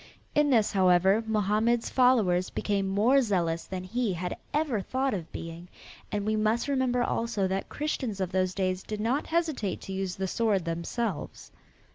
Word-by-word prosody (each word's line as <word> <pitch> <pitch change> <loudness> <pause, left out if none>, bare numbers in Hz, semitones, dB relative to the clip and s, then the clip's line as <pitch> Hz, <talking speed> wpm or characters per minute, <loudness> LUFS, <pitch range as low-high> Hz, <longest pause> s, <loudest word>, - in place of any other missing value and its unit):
In 295 0 +3
this, 225 -6 +3
however, 190 +2 +4
Mohammed's 220 +2 +1
followers 220 -9 +3
became 200 -2 -1
more 220 +8 +4
zealous 175 -8 0
than 185 -1 -5
he 225 +2 -1
had 180 +1 -3 0.2
ever 290 -9 0
thought 260 +5 -1
of 175 -5 -5
being, 165 +1 -7 0.4
and 205 -1 -2
we 215 0 +1
must 215 +3 +1
remember 260 -3 +1
also 230 -5 0
that 190 +1 -3
Christians 260 -8 -3
of 185 -2 -2
those 185 0 0
days 185 -1 0
did 215 +1 -6
not 245 +7 0
hesitate 315 - -1
to 195 - -6
use 190 -1 -3
the 190 0 -2
sword, 205 -3 +1
themselves. 170 +2 -4
205 Hz, 165 wpm, -28 LUFS, 185-240 Hz, 0.4 s, however